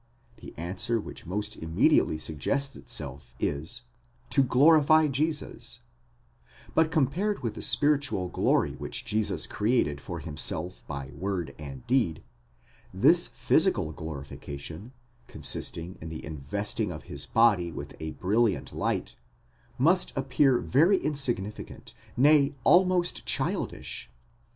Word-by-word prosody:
The - - -11
answer 95 +7 -2
which 100 - -9
most 105 +4 -3
immediately 80 -1 +2
suggests 110 - -1
itself 70 +1 -7
is: 80 +12 -3 0.5
to 140 - +5
glorify 155 +4 +5
Jesus; 150 +2 -3 0.9
but 160 0 +3
compared 170 +7 0
with 115 - -1
the - - -8
spiritual 145 -10 +1
glory - - +1
which - - -4
Jesus 110 -2 0
created 105 - 0
for 85 - -6
himself 80 +3 -2
by 70 -2 -6
word 90 -3 -3
and 70 -3 -8
deed, 115 -11 +1 0.7
this - - +4
physical 80 - +2
glorification, 80 - -7 0.4
consisting 85 +3 -4
in 80 - -6
the 80 - -7
investing 100 +8 -3
of 80 -2 -8
his - - -5
body 105 -7 +3
with 70 -2 -8
a 80 0 -4
brilliant 105 +2 0
light, - - -2 0.6
must 170 +8 +3
appear 135 -1 +3
very 170 +12 +3
insignificant, 120 - -2 0.2
nay, 145 +1 +5
almost 180 -1 +4
childish. - - -2
105 Hz, 115 wpm, -28 LUFS, -, 0.9 s, to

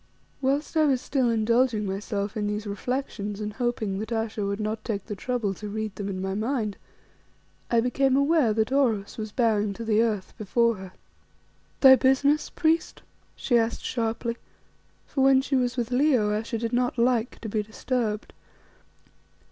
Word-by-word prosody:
Whilst 280 +4 0
I 310 -1 +4
was 270 -4 +2
still 260 -1 0
indulging 230 0 +2
myself 200 +1 -3
in 210 -1 -1
these 210 +1 -3
reflections 210 -1 -3
and 210 0 -4
hoping 220 -5 -2
that 220 +2 -5
Ayesha 225 -2 -2
would 200 +1 -2
not 215 +1 -3
take 200 -4 -3
the 210 - -5
trouble 230 -3 -2
to 210 +2 -7
read 215 0 -3
them 200 -1 -4
in 190 -1 -4
my 190 0 -2
mind, 215 -1 -1 0.9
I 235 -1 +3
became 265 +2 +2
aware 280 -4 +3
that 220 +2 0
Oros 230 -8 +1
was 215 -1 -4
bowing 215 -3 +1
to 230 +3 -7
the 220 0 +3
earth 215 -5 -1
before 230 +2 +2
her. 190 -1 -10 0.9
"Thy 265 -1 +10
business, 280 +4 +2
priest?" 325 +1 0 0.3
she 240 -3 +2
asked 225 0 -2
sharply; 230 0 -2 0.7
for 270 - -2
when 270 0 +6
she 270 +1 -1
was 250 -1 0
with 240 0 -2
Leo 250 -5 +3
Ayesha 225 +2 -2
did 230 +1 -3
not 245 0 +1
like 235 -1 +1
to 225 - -5
be 215 0 -1
disturbed. 220 0 -3
225 Hz, 170 wpm, -26 LUFS, 210-255 Hz, 0.9 s, Thy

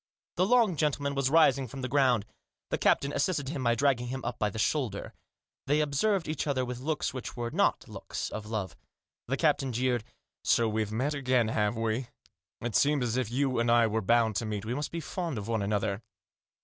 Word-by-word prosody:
The 185 +2 +3
long 225 -7 +4
gentleman 145 -2 0
was 135 -1 +1
rising 140 -4 +4
from 130 +2 -8
the - - -1
ground. 125 -5 +3 0.5
The - - 0
captain 140 +1 +2
assisted 150 -8 0
him 140 -3 -3
by 120 -1 +3
dragging 125 -1 +1
him 130 +1 -5
up - - -4
by 105 - +1
the 110 - -8
shoulder. 110 -3 -1 0.5
They 145 +2 +3
observed 165 +6 +1
each 155 0 -2
other 130 -3 0
with 125 0 -5
looks 150 +2 -2
which 130 -2 -6
were 120 -1 -3
not - - +1
looks - - -5
of 105 -1 -6
love. 105 -4 -3 0.5
The 135 +3 -1
captain 145 -4 +2
jeered. 125 0 0
u - - -30 0.3
So 115 - +3
we've 110 -1 -1
met 130 +7 0
again, 130 -5 +1
have 105 0 0
we? 115 +2 -1 0.5
It 120 -3 -3
seems 145 -2 +3
as 120 -1 -1
if 130 -4 0
you 130 0 0
and 120 0 +1
I 120 0 +5
were 110 0 0
bound 115 +1 +3
to 115 - -1
meet. 105 -1 -3
We 115 - -2
must 145 +3 -3
be 165 - -4
fond 170 -5 -4
of 105 0 -5
one 115 -2 0
another. 100 0 -1
125 Hz, 215 wpm, -29 LUFS, 110-145 Hz, 0.5 s, I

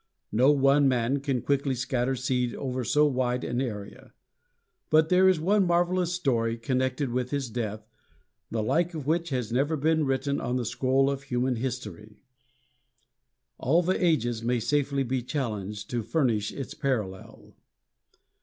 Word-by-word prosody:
No 125 +5 +4
one 140 0 +4
man 130 +1 +1
can 135 -3 -2
quickly 140 -1 0
scatter 125 +1 -1
seed 125 -1 -1
over 130 -2 -3
so 150 +6 +3
wide 125 -3 0
an 120 +1 -1
area. 105 -6 -6 0.8
But 155 +1 +4
there 185 +1 +5
is 185 -4 +2
one 195 +3 +2
marvelous 175 0 +1
story 120 -10 0
connected 130 +2 -1
with 125 0 -1
his 135 -4 -3
death, 110 -2 -4 0.6
the 110 -1 -2
like 170 +9 0
of 150 -4 -5
which 165 +3 0
has 125 -5 -2
never 140 +6 +1
been 160 +2 +2
written 135 +1 -1
on 125 - -2
the 125 -2 -1
scroll 130 +3 +1
of 140 -1 -1
human 125 -2 -1
history. 110 -5 -6 1.4
All 165 +7 +2
the 185 +2 0
ages 120 -9 +1
may 120 +1 0
safely 140 +3 0
be 130 0 -1
challenged 105 -6 -4
to 120 -1 -1
furnish 115 -6 0
its 135 - -6
parallel. 110 - -4
130 Hz, 155 wpm, -27 LUFS, 120-145 Hz, 1.4 s, there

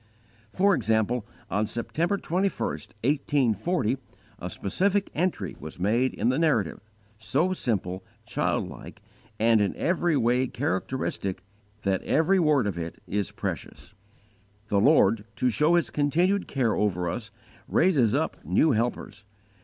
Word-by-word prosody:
For 195 +6 +3
example, 110 - +1 0.2
on 105 +2 +1
September 160 - -1
21, 190 +2 -1
1840, 130 - 0 0.4
a - - -5
specific 195 - 0
entry 160 - -1
was 80 - -9
made 115 +8 +1
in 120 - +1
the 130 - +1
Narrative, 140 - +1 0.4
so 140 +12 +1
simple, 95 - -2 0.2
childlike, - - -3 0.4
and 110 -1 +4
in 100 - 0
every 170 -2 +1
way 125 +2 +2
characteristic, 95 -2 -2 0.4
that 95 -2 +1
every 175 +5 +2
word 150 -7 +3
of 95 -4 -2
it 85 0 -6
is 100 -1 -2
precious. - - -6 0.8
"The 100 - +3
Lord, 115 -5 +4
to 125 - +1
show 150 +10 +3
His 170 - +1
continued 175 +7 +1
care 125 -5 +1
over 90 -4 0
us, 105 +6 -4 0.4
raises 145 - +3
up - - -2
new 95 - +3
helpers. 115 -2 -2
120 Hz, 130 wpm, -26 LUFS, 105-160 Hz, 0.8 s, and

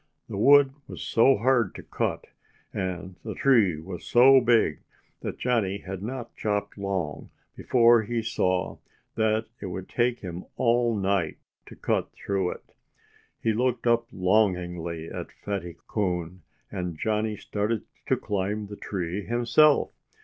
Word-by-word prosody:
The - - -6
wood 140 +6 +6 0.2
was - - -7
so 130 +4 +4
hard 120 -2 +2
to - - -8
cut, - - -2 0.5
and 95 0 -4
the 110 - -5
tree 110 - +4
was 90 +2 -8
so 130 +2 +6
big, 115 -10 +3 0.4
that - - -5
Johnnie 110 -6 0
had 95 0 -6
not 120 +2 -6
chopped 105 -1 -2
long 95 -6 -3 0.3
before 120 -2 +5
he 115 +1 -2
saw 95 -5 -1 0.3
that 110 0 +1 0.2
it 100 - -4
would 95 0 -6
take 120 0 0
him 90 -1 -6
all 120 -1 +2
night 95 -4 0 0.3
to - - -11
cut - - -1
through 95 -2 -1
it. - - -10 0.7
He 110 - +2
looked 125 +1 0
up 115 0 +3
longingly 90 -4 0
at - - -7
Fatty 95 -5 -5
Coon. 90 -3 -2 0.3
And 90 -3 -4
Johnnie 110 +2 -1
started 105 +3 -2 0.2
to - - +2
climb 105 +1 -2
the 105 0 -9
tree 95 0 -4
himself. 120 +6 +4
105 Hz, 140 wpm, -26 LUFS, 95-115 Hz, 0.7 s, wood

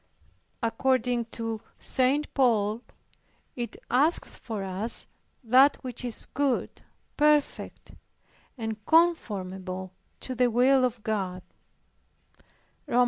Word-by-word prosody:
According 245 0 +1
to 225 -1 -5 0.2
St. 270 +4 +1
Paul 225 -4 +2 0.7
it 240 -1 -5 0.2
"asketh 295 +7 +2
for 220 -5 -6
us 195 +5 +2 0.4
that 260 +5 +5
which 250 -1 -6
is 240 -2 -5
good, 280 -3 -1 0.4
perfect, 300 -1 +1 0.7
and 220 -2 -5
conformable 190 - 0 0.3
to 260 - -4
the 250 0 +2
will 255 +3 +4
of 235 -3 -4
God" 190 -4 -2 1.4
(Rom. 245 - +2
240 Hz, 95 wpm, -27 LUFS, 215-260 Hz, 1.4 s, that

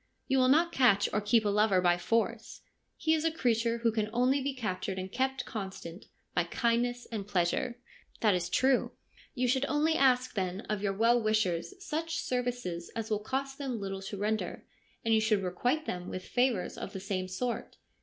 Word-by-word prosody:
You 265 -1 +3
will 255 - +5
not 325 +6 +4
catch 230 -9 +4
or 210 - +1
keep 220 +1 +3
a - - +3
lover 205 -2 +3
by 175 -1 +3
force. 230 +3 -1 0.4
He 315 0 +2
is 315 -1 +1
a 325 - +3
creature 235 -5 +1
who 230 - +4
can 215 -1 -1
only 250 +4 +2
be 275 0 -2
captured 195 -5 -3
and 185 0 -5
kept 265 +1 -1
constant 190 -4 -7 0.3
by - - +1
kindness 240 +1 0
and 205 -3 -4
pleasure.' 200 +5 0 0.2
' - - -28
That 215 -3 +4
is 175 -1 -1
true.' 260 +6 +2 0.2
' - - -26
You 250 -1 +1
should 265 +2 +2
only 305 +2 +2
ask 255 -3 +3
then 185 -1 -2
of 215 -3 -3
your 200 -1 0
well 230 +4 +3
wishers 215 - 0
such 325 +1 -2
services 245 -9 -2
as 225 0 -4
will 210 - +2
cost 270 +5 -3
them 260 -5 -3
little 195 -1 -4
to 195 +1 -6
render, 215 +2 -2 0.4
and 225 - +3
you 220 - +4
should 215 -2 +2
requite 245 - 0
them 180 0 -4
with 185 - -6
favours 245 -7 0
of 200 - -6
the 190 - -4
same 185 -1 -3
sort. 235 +7 -4
225 Hz, 200 wpm, -30 LUFS, 195-255 Hz, 0.4 s, will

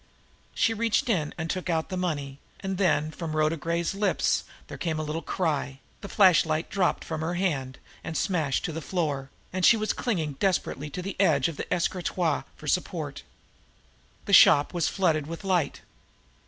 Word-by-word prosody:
She 225 - +2
reached 230 +2 0
in 160 -9 +1
and 160 -1 -3
took 185 +2 -3
out 160 -1 0
the 185 - -3
money 145 -7 -3 0.2
and 190 -1 -3
then 155 -5 +2
from 160 -1 -5
Rhoda 155 +1 +2
Gray's 170 +2 -1
lips 200 0 +1 0.2
there - - -9
came 160 -3 -1
a 155 - -2
little 155 +2 -3
cry, 150 -8 -2 0.2
the 200 - -7
flashlight 165 -5 +3
dropped 185 -3 +1
from 160 -1 -4
her 165 +2 -2
hand 135 -9 -1 0.3
and 165 -1 -4
smashed 160 -9 0
to - - -2
the 160 +1 -5
floor, 145 -7 -2 0.2
and 185 0 -2
she 230 - +7
was 215 -1 0
clinging 160 - -2
desperately 155 -6 0
to 180 +5 -6
the 195 +1 -5
edge 145 -8 +4
of 165 -3 -6
the - - -6
escritoire 175 -2 0
for - - -12
support. - - -2 1.0
The - - -2
shop 145 +4 +7
was 170 -3 +1
flooded 160 -6 +1
with 165 +3 -7
light. 185 -5 0
165 Hz, 180 wpm, -27 LUFS, 155-185 Hz, 1.0 s, she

